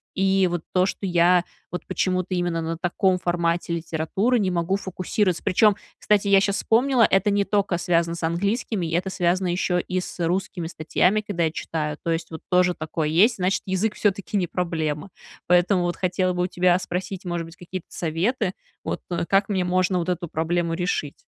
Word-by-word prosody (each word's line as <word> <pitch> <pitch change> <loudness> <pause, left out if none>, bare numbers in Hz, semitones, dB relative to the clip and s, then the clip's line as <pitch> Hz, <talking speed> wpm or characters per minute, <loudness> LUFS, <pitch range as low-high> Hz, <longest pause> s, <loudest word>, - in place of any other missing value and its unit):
И 195 0 +3
вот 175 -2 -2
то, 185 0 +4
что 195 - -4
я 175 0 +4 0.3
вот 180 - -6
почему-то 185 0 -1
именно 175 -2 -1
на 165 0 -3
таком 185 +1 +1
формате 170 -1 0
литературы 170 +9 0
не 190 -3 +1
могу 175 +2 0
фокусироваться. 185 -1 -1
Причем, 210 +2 +4 0.2
кстати, 205 -1 +2
я 195 -1 +6
щас 200 0 0
вспомнила, 250 +2 +2
это 195 +2 +3
не 200 0 +2
только 195 -3 0
связано 170 -1 +1
с 170 - -8
английскими, 200 +3 -1
это 185 +2 0
связано 180 +1 0
еще 180 0 0
и 185 0 -2
с 180 - -9
русскими 180 -1 -2
статьями, 180 +6 +1
когда 200 -5 -2
я 160 - 0
читаю. 150 -2 -3
То 165 - -1
есть 165 0 -2
вот 160 - -7
тоже 180 0 +3
такое 155 0 -3
есть, 205 +9 +4
значит, 185 +1 0
язык 195 +3 -1
всё-таки 200 0 0
не 180 - +1
проблема. 160 -1 -2 0.4
Поэтому 180 +1 +4
вот 175 -1 -1
хотела 185 0 0
бы 180 0 0
у - - 0
тебя 180 0 +3
спросить, 185 +1 -5
может 175 -1 -2
быть, 165 0 -13
какие-то 180 0 -7
советы, 180 +6 -1 0.3
вот - - -3 0.3
как 195 +1 +2
мне 190 -3 +1
можно 185 +1 +1
вот 175 +1 -2
эту 175 -1 -2
проблему 165 +1 -1
решить. 175 -5 -2
180 Hz, 185 wpm, -24 LUFS, 170-195 Hz, 0.4 s, я